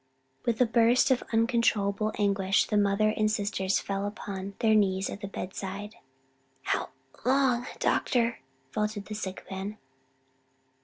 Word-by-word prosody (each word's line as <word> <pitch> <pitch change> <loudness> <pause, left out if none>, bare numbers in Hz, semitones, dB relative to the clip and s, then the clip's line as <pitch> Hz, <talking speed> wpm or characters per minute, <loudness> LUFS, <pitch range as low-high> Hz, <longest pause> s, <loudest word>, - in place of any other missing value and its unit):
With 230 -2 +1
a 250 - +6
burst 235 +3 +4
of 255 - +3
uncontrollable 220 -3 +2
anguish 195 -1 +2
the - - -2
mother 205 +1 +3
and 215 0 +2
sisters 200 -2 0
fell 195 0 -2
upon 200 -2 -6
their 220 -1 +3
knees 190 -2 +2
at 200 - -7
the 200 - -4
bedside. 195 +2 -6 0.7
"How - - -1 0.3
long 255 -1 +2
doctor?" 235 -2 +1 0.3
faltered 210 +1 -2
the 215 - -7
sick 190 -3 -5
man. 195 +3 -5
210 Hz, 135 wpm, -28 LUFS, 195-230 Hz, 0.7 s, a